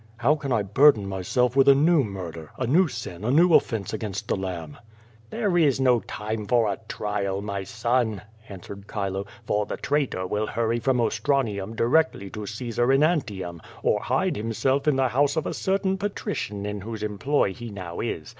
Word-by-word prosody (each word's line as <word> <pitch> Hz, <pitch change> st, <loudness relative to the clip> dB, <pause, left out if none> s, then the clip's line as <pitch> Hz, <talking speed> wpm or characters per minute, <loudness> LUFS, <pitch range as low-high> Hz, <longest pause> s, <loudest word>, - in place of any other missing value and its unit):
"How 125 Hz, +5 st, +3 dB
can 145 Hz, -3 st, -4 dB
I 115 Hz, -4 st, +2 dB
burden 105 Hz, +1 st, +5 dB
myself 115 Hz, +7 st, 0 dB
with 135 Hz, 0 st, +6 dB
a 140 Hz, -, +8 dB
new 155 Hz, +1 st, +4 dB
murder, 85 Hz, -7 st, -7 dB
a 130 Hz, -, -1 dB
new 165 Hz, +9 st, +4 dB
sin, 105 Hz, -, -7 dB
a 115 Hz, -, -1 dB
new 165 Hz, +6 st, +5 dB
offence 110 Hz, -9 st, +2 dB
against 105 Hz, -1 st, -4 dB
the -, -, +1 dB
Lamb? 90 Hz, -5 st, -5 dB
QUO -, -, -12 dB
VADI8. 110 Hz, -, -13 dB
141 205 Hz, -4 st, +2 dB
"There -, -, +3 dB
is 135 Hz, -2 st, +1 dB
no 125 Hz, -2 st, +4 dB
time 110 Hz, -1 st, -5 dB
for 120 Hz, -3 st, +3 dB
a -, -, -9 dB
trial, 100 Hz, -2 st, -2 dB
my 100 Hz, -2 st, -3 dB
son," 110 Hz, 0 st, -1 dB, 0.3 s
answered 100 Hz, +1 st, -9 dB
Chilo, 100 Hz, -1 st, -3 dB, 0.2 s
"for 105 Hz, -1 st, 0 dB
the -, -, -4 dB
traitor 140 Hz, -10 st, -1 dB
will 105 Hz, +3 st, -1 dB
hurry 115 Hz, +1 st, 0 dB
from 130 Hz, +1 st, +1 dB
Ostranium 110 Hz, -3 st, 0 dB
directly 120 Hz, -, +1 dB
to 105 Hz, -1 st, -6 dB
Caesar 120 Hz, +3 st, -1 dB
in 135 Hz, +2 st, +4 dB
Antium, 100 Hz, -, -1 dB, 0.2 s
or -, -, +2 dB
hide -, -, 0 dB
himself 130 Hz, +6 st, 0 dB
in 150 Hz, -, +4 dB
the 130 Hz, -1 st, +2 dB
house 140 Hz, +5 st, +2 dB
of 160 Hz, -, -1 dB
a -, -, -2 dB
certain 190 Hz, 0 st, 0 dB
patrician 140 Hz, -, -3 dB
in 105 Hz, -1 st, -4 dB
whose 110 Hz, +1 st, -6 dB
employ 105 Hz, +1 st, 0 dB
he 120 Hz, +1 st, -8 dB
now 90 Hz, -4 st, -7 dB
is. -, -, -3 dB
110 Hz, 195 wpm, -25 LUFS, 100-135 Hz, 0.3 s, a